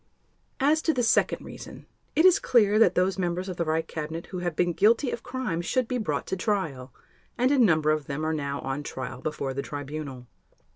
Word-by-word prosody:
As 300 +3 +3
to 320 - +1
the 245 - +1
second 230 - +2
reason, - - -10 0.3
it 320 - +4
is 370 -2 +7
clear 215 -3 +3
that 185 -5 +5
those 185 +1 +1
members 180 +1 -1
of 185 -2 -5
the 170 - 0
Reich 160 +1 0
Cabinet 160 +2 -5
who 185 - -6
have 175 -2 -2
been 175 +1 +1
guilty 225 - +3
of 235 - -4
crimes 245 -10 -3
should 255 -2 +1
be 250 0 -1
brought 220 - -2
to - - -2
trial; 170 - -2 0.5
and 255 +2 +3
a 285 - +3
number 160 -9 +4
of 155 -2 -1
them 150 +2 -3
are 160 - 0
now 140 -2 -3
on 135 +2 -3
trial 130 -3 -6
before 140 -3 -3
the 140 - -2
Tribunal. 145 -3 -6
175 Hz, 210 wpm, -26 LUFS, 150-225 Hz, 0.5 s, is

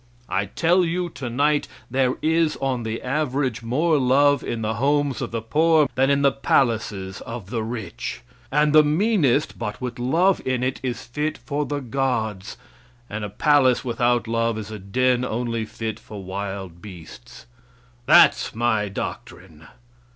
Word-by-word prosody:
I 95 +1 0
tell 175 - +2
you 175 +1 -1
tonight 145 +2 0 0.2
there 130 -1 +1
is 160 0 +2
on 130 -3 -1
the 110 0 -4
average 135 -3 -1
more 150 +7 +1
love 140 +2 +3
in 115 -1 -3
the 110 +1 -1
homes 140 0 +1
of - - -3
the 115 -1 -4
poor 155 +4 +3
than 135 +3 +2
in 140 0 +2
the 140 - +5
palaces 110 -8 0
of 115 -4 -8
the 115 -3 -1
rich; 110 - -5 0.3
and 150 +1 +3
the 155 - +8
meanest 155 - +1
but 105 0 -4
with 125 -1 -5
love 170 +10 +2
in 130 -1 -1
it 130 +1 -1
is 125 -2 -4
fit 150 +5 -3
for 145 0 -3
the 145 -1 -3
gods, 115 -6 -2 0.5
and 105 +1 -4
a 105 - -4
palace 130 +2 +3
without 120 -1 +1
love 115 0 0
is 110 0 -6
a 110 - -6
den 125 +6 +1
only 115 -1 -2
fit 110 0 -5
for 105 -3 -10
wild 95 -2 -6
beasts. 85 - -12 0.6
That's - - +5
my 110 -3 +1
doctrine! 80 -4 -7
125 Hz, 160 wpm, -23 LUFS, 110-145 Hz, 0.6 s, the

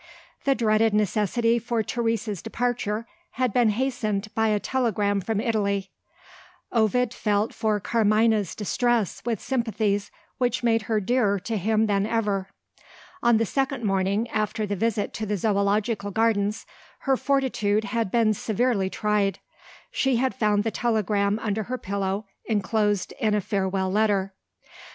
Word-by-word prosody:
The 275 -1 +3
dreaded 220 -2 +2
necessity 215 +3 +1
for 230 -1 -1
Teresa's 225 -3 -2
departure 230 -2 -2 0.3
had 255 -4 0
been 240 -3 +4
hastened 215 -3 -1
by 225 0 +2
a 210 -1 +2
telegram 205 -5 0
from 220 +2 -1
Italy: 200 -4 -1 0.8
Ovid 235 +2 +2
felt 210 -1 0
for 215 -2 0
Carmina's 215 -1 +2
distress 235 0 0
with 230 -4 -1
sympathies 220 -5 -1 0.3
which 245 -1 0
made 230 -1 +3
her 220 -1 +2
dearer 210 -1 +1
to 225 +3 -3
him 215 +2 +2
than 200 -1 +1
ever. 205 -4 -1 0.7
On 235 -1 +4
the 225 - +1
second 270 +1 -1
morning 195 +2 +1
after 215 0 -1
the 205 0 -2
visit 220 +1 -1
to 220 -2 -4
the 205 0 0
Zoological 205 +1 0
Gardens, 210 -1 +1 0.4
her 270 -1 +2
fortitude 250 -7 +1
had 220 0 -1
been 225 0 +3
severely 215 -2 0
tried. 205 -2 0 0.5
She 265 -1 +1
had 260 +2 +1
found 210 -4 +1
the 225 - -1
telegram 210 -3 +1
under 220 -1 -2
her 255 +1 -3
pillow, 200 -1 -2 0.2
enclosed 210 -1 0
in 215 -1 +2
a - - +2
farewell 190 -2 -1
letter. 200 -2 +1
215 Hz, 140 wpm, -25 LUFS, 205-230 Hz, 0.8 s, been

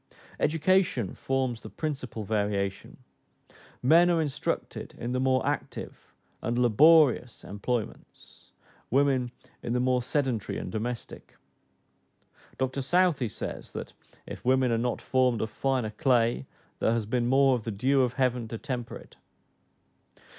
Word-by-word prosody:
Education 160 - +2
forms 130 -3 -2
the - - -9
principal 135 -8 -4
variation: 100 -2 -2 0.9
men 165 +7 +6
are 170 -1 +3
instructed 150 -4 -3
in 120 - -4
the 130 - 0
more 130 0 +2
active - - -5 0.3
and 120 +2 -1
laborious 125 +1 +4
employments, 105 +3 -6 0.4
women 135 -1 +2 0.3
in 120 - -3
the 125 - +1
more 125 0 +2
sedentary 125 -4 -1
and - - -5
domestic. 115 +2 -6 1.2
Dr 130 +1 -1
Southey 165 -3 +2
says, - - -7
that - - -6 0.3
"if - - -9
women 130 0 +3
are 115 - +1
not 125 +1 -2
formed 130 -3 +2
of 110 - -3
finer 130 -5 -1
clay, 120 - +1 0.3
there 115 - +2
has 115 -2 -1
been 120 +2 0
more 135 +1 +4
of 120 -3 -1
the 115 - -4
dew 130 +6 +2
of 125 -2 +1
heaven 125 -2 0
to 115 - -5
temper 120 -1 -5
it." - - -13
125 Hz, 135 wpm, -28 LUFS, 115-135 Hz, 1.2 s, men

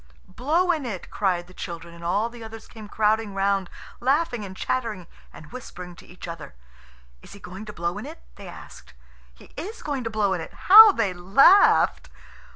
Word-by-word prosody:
"Blow 330 +9 +1
in 315 -4 -2
it," 210 -8 -7
cried 180 -4 -1
the 180 - -17
children; 170 -1 -8
and 170 0 -13
all 200 +6 0
the 235 -1 -11
others 225 0 -11
came 215 -3 -12
crowding 215 -1 0
round, 195 -1 0 0.3
laughing 265 -2 0
and 190 -1 -9
chattering 225 -8 -3 0.3
and 150 - -14
whispering 180 -8 -10
to - - -16
each 180 0 -11
other. 165 - -9 0.7
"Is - - -14
he 200 - -13
going 190 +3 -10
to 210 - -8
blow 170 -2 -4
in - - -8
it?" 60 - -12
they - - -12
asked. - - -13 0.4
"He - - -18
is 430 +6 -8
going 280 -4 -3
to - - -2
blow 210 -3 0
in 180 - -3
it." - - -10 0.2
How 435 +1 +11
they 195 - -1
laughed! 200 - +4
205 Hz, 190 wpm, -24 LUFS, 180-245 Hz, 0.7 s, How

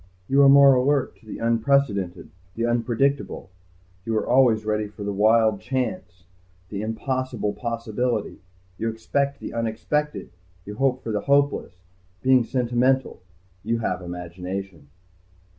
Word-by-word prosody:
You 140 +1 +4
are 140 - +7
more 140 0 +8
alert 130 +1 +1
to 110 - -23
the - - -7
unprecedented, 115 -5 0 0.2
the 115 - -1
unpredictable. 120 -2 -1 0.5
You 115 +1 -1
are - - -1
always 120 -4 +3
ready 105 0 -1
for 105 0 -10
the 100 0 -2
Wild 110 0 +3
Chance, 110 -9 -4 0.5
the 100 -1 -4
impossible 120 -1 -2
possibility. 115 0 -3 0.4
You 115 +1 -1
expect 140 +5 -2
the - - -7
unexpected. 115 +7 -2 0.3
You 105 +1 -8
hope 130 -1 +1
for 115 - -4
the 105 -1 -1
hopeless. 140 -10 0 0.4
Being 130 -1 +5
sentimental, 125 0 0 0.4
you 115 +2 0
have 95 -5 -2
imagination." 90 -1 -7
115 Hz, 130 wpm, -24 LUFS, 105-130 Hz, 0.5 s, more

